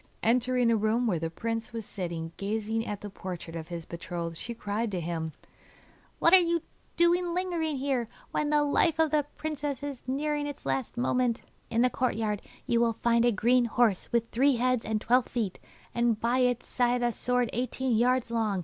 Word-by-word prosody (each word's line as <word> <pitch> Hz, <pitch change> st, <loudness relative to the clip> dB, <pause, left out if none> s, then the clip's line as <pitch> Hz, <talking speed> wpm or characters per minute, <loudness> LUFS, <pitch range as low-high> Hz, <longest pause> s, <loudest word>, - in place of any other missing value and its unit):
Entering 245 Hz, +1 st, +3 dB
a -, -, +4 dB
room 220 Hz, +3 st, +1 dB
where 185 Hz, -8 st, +1 dB
the 165 Hz, +1 st, -2 dB
prince 225 Hz, +7 st, -3 dB
was 225 Hz, -2 st, -4 dB
sitting 170 Hz, -5 st, -4 dB
gazing 220 Hz, +2 st, -2 dB
at 205 Hz, -1 st, -4 dB
the 205 Hz, -, -6 dB
portrait 180 Hz, -3 st, -7 dB
of 160 Hz, -1 st, -5 dB
his 170 Hz, -2 st, -6 dB
betrothed, 170 Hz, -1 st, -5 dB
she 235 Hz, +8 st, -6 dB
cried 215 Hz, +1 st, -2 dB
to 190 Hz, -3 st, -2 dB
him: 165 Hz, -1 st, -3 dB, 0.9 s
'What 335 Hz, -, +4 dB
are 380 Hz, -, +11 dB
you 335 Hz, -2 st, +1 dB, 0.3 s
doing 345 Hz, 0 st, +3 dB
lingering 340 Hz, -5 st, -1 dB
here, 260 Hz, -3 st, 0 dB, 0.2 s
when 300 Hz, -, 0 dB
the 295 Hz, 0 st, +3 dB
life 295 Hz, +2 st, +2 dB
of 320 Hz, -2 st, +3 dB
the 295 Hz, -2 st, +2 dB
princess 295 Hz, -3 st, -3 dB
is 285 Hz, -3 st, -5 dB
nearing 295 Hz, +2 st, -1 dB
its 290 Hz, -, -8 dB
last 135 Hz, -, -2 dB
moment? 250 Hz, -1 st, +1 dB, 0.3 s
In 230 Hz, +1 st, +2 dB
the 250 Hz, -, +4 dB
courtyard 220 Hz, -4 st, -1 dB, 0.2 s
you 235 Hz, -, +2 dB
will 235 Hz, -1 st, +3 dB
find 235 Hz, 0 st, +4 dB
a 240 Hz, -, +5 dB
green 240 Hz, +3 st, +3 dB
horse 230 Hz, -4 st, +1 dB
with 235 Hz, -1 st, +1 dB
three 270 Hz, +3 st, +4 dB
heads 250 Hz, 0 st, +1 dB
and 220 Hz, -1 st, -1 dB
twelve 245 Hz, +3 st, +3 dB
feet, 220 Hz, -7 st, -2 dB, 0.3 s
and 235 Hz, -2 st, +2 dB
by 240 Hz, +3 st, +1 dB
its 250 Hz, -1 st, +1 dB
side 245 Hz, -1 st, +1 dB
a 240 Hz, -, +2 dB
sword 250 Hz, 0 st, 0 dB
eighteen 250 Hz, 0 st, 0 dB
yards 245 Hz, +1 st, +2 dB
long. 220 Hz, -4 st, 0 dB
235 Hz, 195 wpm, -29 LUFS, 210-260 Hz, 0.9 s, are